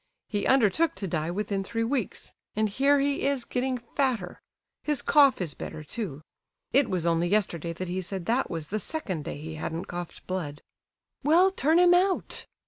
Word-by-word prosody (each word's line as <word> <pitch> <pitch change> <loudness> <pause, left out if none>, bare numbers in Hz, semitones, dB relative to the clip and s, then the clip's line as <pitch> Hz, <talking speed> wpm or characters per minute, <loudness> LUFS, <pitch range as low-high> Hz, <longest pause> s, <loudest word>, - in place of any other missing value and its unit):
He 205 -2 -1
undertook 265 - +3
to 190 0 -4
die 160 -2 -1
within 195 +1 -2
three 230 +3 -2
weeks, 240 -2 -2 0.2
and 215 +1 +2
here 275 +7 +3
he 280 0 0
is 275 -3 0
getting 255 0 -1 0.2
fatter. 245 -10 -1 0.4
His 295 -3 0
cough 280 -3 +5
is 170 -6 -2
better, 155 - -7
too. 155 - -5 0.5
It 275 -3 +4
was 180 -3 -1
only 170 0 +2
yesterday 175 -4 0
that 185 +2 -5
he 185 +2 -2
said 185 -1 -4
that 245 +6 +1
was 160 -3 -4
the 215 - -1
second 190 - -3
day - - -4
he 160 +2 -7
hadn't 165 +2 -3
coughed 175 -1 -7
blood." 160 -6 -4 0.6
"Well, 345 +7 +5
turn 320 -3 +2
him 355 0 +6
out!" 370 +1 +1
210 Hz, 180 wpm, -27 LUFS, 175-275 Hz, 0.6 s, him